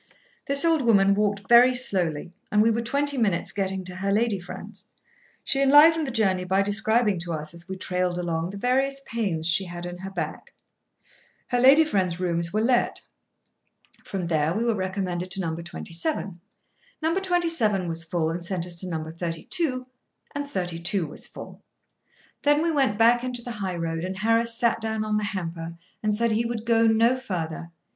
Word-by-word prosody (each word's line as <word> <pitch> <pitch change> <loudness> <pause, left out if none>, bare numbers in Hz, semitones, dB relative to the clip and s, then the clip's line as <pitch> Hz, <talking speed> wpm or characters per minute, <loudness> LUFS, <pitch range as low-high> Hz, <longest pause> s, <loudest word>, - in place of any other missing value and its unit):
This 280 +3 +3
old 325 -3 +3
woman 200 -5 +4
walked 200 -1 -1
very 245 +2 +7
slowly, 175 - -1 0.2
and 210 0 +4
we 230 - +4
were 230 +1 0
twenty 280 +3 -1
minutes 200 -7 0
getting 190 -1 -2
to 180 0 -6
her 195 +1 -1
lady 215 -1 +1
friend's. 175 - -8 0.5
She 275 - +1
enlivened 300 +3 +6
the - - -3
journey 195 -6 +1
by 190 +2 +2
describing 215 0 +1
to 170 0 -3
us, 155 0 -5
as 170 +1 -9
we 190 0 -5
trailed 180 -1 -1
along, 170 -1 -2
the 200 - -7
various 265 +5 +1
pains 190 -9 -1
she 170 +3 +3
had 175 0 -7
in 175 0 -7
her 190 +1 -6
back. 195 - -6 0.9
Her 245 - +1
lady 270 +5 +7
friend's 185 - -1
rooms 170 -2 -1
were 215 +1 0
let. 245 +1 +1 1.0
From 190 -3 -4
there 160 0 0
we 225 - 0
were 235 -1 +2
recommended 185 -2 -3
to - - -1
No. 165 -3 -2
27. 175 - -4 0.6
No. 320 +1 +2
27 335 - +1
was 165 0 -2
full, 165 -1 -1
and 170 +1 -5
sent 175 -1 -2
us 175 -1 -4
to 185 - -3
No. 160 -2 -4
32, 185 - -2 0.5
and 285 0 -4
32 175 - -2
was 150 - -8
full. - - -11 0.8
Then 290 +1 +3
we 335 - +1
went 270 -9 +1
back 235 +2 +4
into 250 -1 -3
the 245 - -6
high 195 -5 -4
road, 165 -1 -3
and 185 +1 -4
Harris 230 +2 +1
sat 235 -1 +1
down 220 -1 -2
on 215 0 0
the 210 - -1
hamper 170 -3 -5 0.2
and 210 -1 +1
said 230 +1 +1
he 220 +2 +1
would 230 -1 -4
go 230 -1 +4
no 230 +3 +4
further. 170 -9 -5
200 Hz, 185 wpm, -25 LUFS, 175-235 Hz, 1.0 s, very